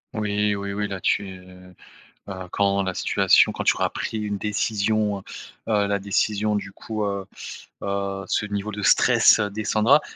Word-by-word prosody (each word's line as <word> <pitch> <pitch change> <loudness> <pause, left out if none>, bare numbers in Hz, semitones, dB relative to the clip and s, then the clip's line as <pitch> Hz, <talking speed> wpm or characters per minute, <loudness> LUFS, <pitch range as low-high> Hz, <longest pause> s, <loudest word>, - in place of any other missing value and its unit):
Oui, 105 -1 0
oui, 100 0 -4
oui, 105 0 -2
là-dessus, 95 0 -2 0.9
heu, 95 -1 -7
quand 100 -1 +1
la 95 -1 -3
situation - - +4
quand - - -4
tu - - +3
auras - - +1
pris 110 - -4
une 105 -2 -3
décision, 105 0 0
heu, - - -13 0.5
heu, 105 -1 +3
la 100 0 0
décision 105 +1 0
du 100 -1 -4
coup, 110 +1 -5
heu, 100 -1 -3 0.6
heu, 100 0 -3
ce 105 - 0
niveau 105 +1 -3
de 105 0 -6
stress - - +5
descendra 110 +6 +3
100 Hz, 160 wpm, -23 LUFS, 100-105 Hz, 0.9 s, stress